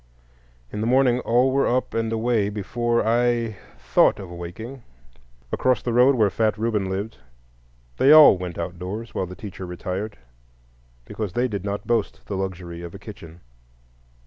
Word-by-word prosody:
In 105 - -4
the 110 - -1
morning 125 -1 +3
all 125 +2 +2
were 140 +1 +2
up 125 +1 0
and 115 0 -1
away 115 -2 +1
before 115 +3 -1
I 120 -2 +1 0.2
thought - - +3
of 95 -3 -9
awaking. 100 +10 -8 0.7
Across 130 -1 +1
the 120 - -1
road, 125 +3 +5
where 105 -5 +3
fat 110 -2 0
Reuben 105 -3 -1
lived, 100 +4 -4 0.8
they 135 - +5
all 155 -7 +9
went 90 -2 -6
outdoors 90 +6 -5
while 95 - -2
the 90 - -9
teacher 95 -2 -8
retired, 95 +4 -5 0.9
because 105 -5 -5
they 125 +1 +1
did 100 -5 -4
not 100 0 -4
boast 115 -3 -1
the 100 - -4
luxury 90 -3 -5
of 85 -1 -8
a - - -6
kitchen. 85 +1 -12
110 Hz, 160 wpm, -23 LUFS, 95-120 Hz, 0.9 s, all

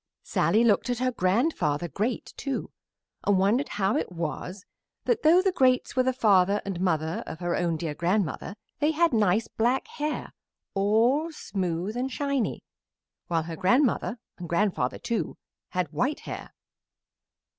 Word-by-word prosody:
Sallie 220 +2 +2
looked 230 +1 +3
at 245 - 0
her 255 +1 +1
Grandfather 185 - +1
Great, 215 - -3
too, 275 -2 -4 0.5
and 205 -1 +3
wondered 215 +9 +2
how 195 +1 +2
it - - -1
was 180 +3 -5 0.4
that, 480 - +1
though 340 +4 +6
the 385 - +3
Greats 255 -7 +2
were 255 - +4
the 260 0 +2
father 205 -5 +3
and 190 -3 -3
mother 160 -3 0
of - - -6
her 175 -1 -1
own 170 -2 0
dear 155 -1 -3
grandmother, 180 +2 -1 0.2
they 300 +2 +2
had 335 -1 +3
nice 215 0 +2
black 245 +4 0
hair, 300 +1 -4 0.4
all 230 +11 +2
smooth 190 - -3
and 255 +2 -2
shiny, 280 -4 -1 0.6
while 165 -2 0
her 165 0 -6
grandmother 245 - +2 0.2
and 175 -2 -7
grandfather, 170 -8 +1
too, 235 - -3 0.3
had 180 -4 -2
white 260 - 0
hair. - - -7
210 Hz, 150 wpm, -27 LUFS, 180-255 Hz, 0.6 s, though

